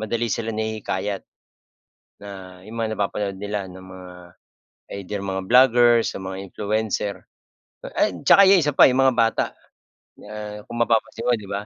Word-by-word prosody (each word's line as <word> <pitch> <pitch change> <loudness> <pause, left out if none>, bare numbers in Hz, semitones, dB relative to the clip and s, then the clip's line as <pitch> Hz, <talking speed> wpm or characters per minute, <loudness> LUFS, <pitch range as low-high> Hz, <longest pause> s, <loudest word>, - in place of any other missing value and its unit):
madali 115 +2 -2
silang 115 -1 -3
nahihikayat 105 -3 -3 1.0
na 95 -2 -10
'yung 110 +3 -10
mga 110 -1 -1
napapanood 100 -1 -2
nila 105 -1 -4
ng 95 +1 -12
mga 95 -1 -12 0.9
either 100 +2 -5
mga 95 0 -3
vloggers 120 -2 +5
o 95 - -7
mga 95 0 -6
influencer. 105 -1 -2 0.8
Ay - - +2
tsaka 200 - +7
'yung 190 -3 +6
isa 150 -1 0
pa, - - +8
'yung 130 +1 +2
mga 130 -2 +3
bata, 115 -1 +2 1.2
kung 120 - -7
mapapansin 115 0 0
mo, - - +4
'di 105 - -11
ba? 100 +1 -4
105 Hz, 150 wpm, -22 LUFS, 95-115 Hz, 1.2 s, pa